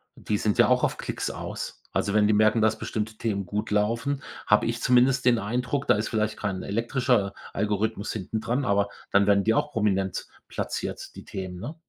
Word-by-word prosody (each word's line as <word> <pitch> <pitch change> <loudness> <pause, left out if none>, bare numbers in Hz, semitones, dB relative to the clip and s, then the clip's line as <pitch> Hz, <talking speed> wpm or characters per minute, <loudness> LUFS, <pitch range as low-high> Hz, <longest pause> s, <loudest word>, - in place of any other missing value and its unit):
die 105 - -2
sind 105 0 0
ja - - +6
auch - - +3
auf - - +1
Klicks - - -3
aus. - - -6
Also, 100 - 0
wenn 105 -1 +4
die 105 - +3
merken, 110 +1 +4
dass 110 0 +3
bestimmte 110 0 -4
Themen 100 -4 -2
gut 105 +3 -3
laufen, 115 +7 0 0.3
habe 105 - +4
ich 115 +1 -2
zumindest 125 +1 +4
den 120 -2 +5
Eindruck, 125 +6 -2
da - - +5
ist 110 - -2
vielleicht 110 -1 -1
kein 100 -3 -3
elektrischer 115 -1 0 0.2
Algorithmus 105 +1 -1
hinten 110 +1 -4
dran, 125 +5 -1
aber 100 -1 +2 0.2
dann 100 0 +4
werden 100 -1 +4
die 110 - +4
auch 150 +6 0
prominent 95 -4 0 0.2
platziert, - - -4
die - - -9
Themen, 95 -2 -6
ne? 150 - -6
110 Hz, 195 wpm, -26 LUFS, 100-115 Hz, 0.3 s, ja